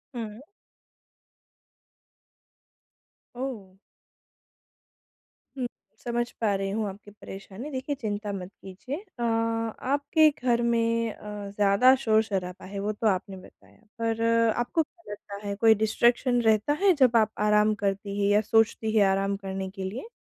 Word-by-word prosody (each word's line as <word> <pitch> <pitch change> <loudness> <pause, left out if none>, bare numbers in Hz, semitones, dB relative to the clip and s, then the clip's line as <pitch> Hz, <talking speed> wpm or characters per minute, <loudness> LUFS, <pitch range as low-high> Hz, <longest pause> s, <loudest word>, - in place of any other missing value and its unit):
हुँ। 220 -1 -6 3.0
ओह! 225 -8 -6 1.8
हुँ। 250 -2 -1 0.4
समझ 240 0 -1
पा 210 -3 +2
रही 195 0 -2
हूँ 215 0 -1
आपकी 205 +1 -12
परेशानी। 200 +5 -9
देखिए, 265 +2 -3
चिंता 210 -3 -4
मत 185 0 -6
कीजिए। 195 +9 -7 0.2
अ, 235 - -1
आपके 230 +7 +1
घर 240 -1 +2
में 230 -1 +1
अ, 210 -1 -8
ज़्यादा 205 +6 +5
शोर-शराबा 205 -5 0
है, 200 +1 -6
वो 205 +2 -1
तो 215 +1 -1
आपने 190 0 -1
बताया, 185 - -18 0.2
पर 225 0 -1 0.3
आपको 275 +7 0
क्या 340 - -16
लगता 205 0 -8
है, 200 - -2
कोई 220 +1 +5
डिस्ट्रैक्शन 240 +3 +2
रहता 220 +5 +3
है, 385 -2 +6
जब 245 -2 +5
आप 220 -1 +3 0.2
आराम 210 0 +4
करती 200 +1 -2
हैं 200 - +2
या 210 - +4
सोचती 220 0 +2
हैं 205 - +6
आराम 195 +1 +1
करने 190 0 -4
के 190 0 -7
लिए? 215 - -5
215 Hz, 135 wpm, -27 LUFS, 200-235 Hz, 3.0 s, है